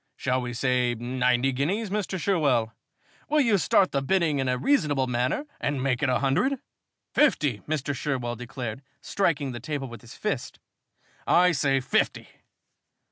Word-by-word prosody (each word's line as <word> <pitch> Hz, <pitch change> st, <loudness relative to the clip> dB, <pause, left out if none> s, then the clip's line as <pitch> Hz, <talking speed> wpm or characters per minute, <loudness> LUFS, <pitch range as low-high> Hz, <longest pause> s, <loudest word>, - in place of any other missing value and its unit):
Shall 130 Hz, 0 st, 0 dB
we 125 Hz, 0 st, -4 dB
say 125 Hz, 0 st, +1 dB
ninety 125 Hz, +2 st, +1 dB
guineas, 185 Hz, -, -1 dB
Mr. 195 Hz, -2 st, -2 dB
Sherwell? 140 Hz, -, +1 dB, 0.6 s
Will 305 Hz, -, +3 dB
you 225 Hz, -7 st, +3 dB
start 180 Hz, +4 st, +3 dB
the 140 Hz, -, 0 dB
bidding 160 Hz, -1 st, +1 dB
in 135 Hz, -1 st, 0 dB
a 125 Hz, -, +1 dB
reasonable 145 Hz, -, +2 dB
manner 125 Hz, -, -1 dB
and 140 Hz, -2 st, -1 dB
make 130 Hz, -1 st, 0 dB
it 145 Hz, -, +2 dB
a 125 Hz, -, +3 dB
hundred?" 180 Hz, -, +1 dB, 0.6 s
"Fifty!" 150 Hz, -, +2 dB
Mr. 145 Hz, -2 st, -1 dB
Sherwell 125 Hz, -4 st, -2 dB
declared, 120 Hz, 0 st, -6 dB, 0.2 s
striking 150 Hz, -8 st, 0 dB
the 120 Hz, -, -6 dB
table 140 Hz, +2 st, -4 dB
with 120 Hz, -1 st, -10 dB
his 120 Hz, -, -13 dB
fist. -, -, -3 dB, 0.7 s
"I 180 Hz, +1 st, +5 dB
say 135 Hz, -4 st, +1 dB
fifty!" 130 Hz, -, 0 dB
135 Hz, 155 wpm, -26 LUFS, 125-165 Hz, 0.7 s, I